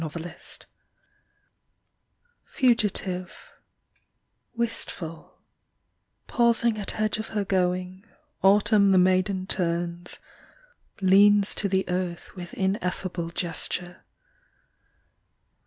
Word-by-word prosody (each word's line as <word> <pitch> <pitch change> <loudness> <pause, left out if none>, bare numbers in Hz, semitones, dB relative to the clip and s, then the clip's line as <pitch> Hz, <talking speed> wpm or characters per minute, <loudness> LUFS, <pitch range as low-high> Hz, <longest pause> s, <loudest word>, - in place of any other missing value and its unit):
100 160 +1 -6
AUTUMN 175 - -9 1.8
Fugitive, 195 -7 -1 1.0
wistful, 210 -8 -3 0.9
Pausing 235 -2 +2
at 205 - -2
edge 215 0 0
of 220 - -4
her 210 -2 -2
going, 185 0 -1 0.4
Autumn 200 0 +4
the - - +5
maiden 185 +1 +2
turns, 175 -2 0 0.8
Leans 200 +2 +5
to 200 - -1
the 190 0 +1
earth 180 0 -4
with 175 -2 -8
ineffable 185 -3 -2
Gesture. 175 +1 -3
185 Hz, 80 wpm, -25 LUFS, 180-205 Hz, 1.8 s, the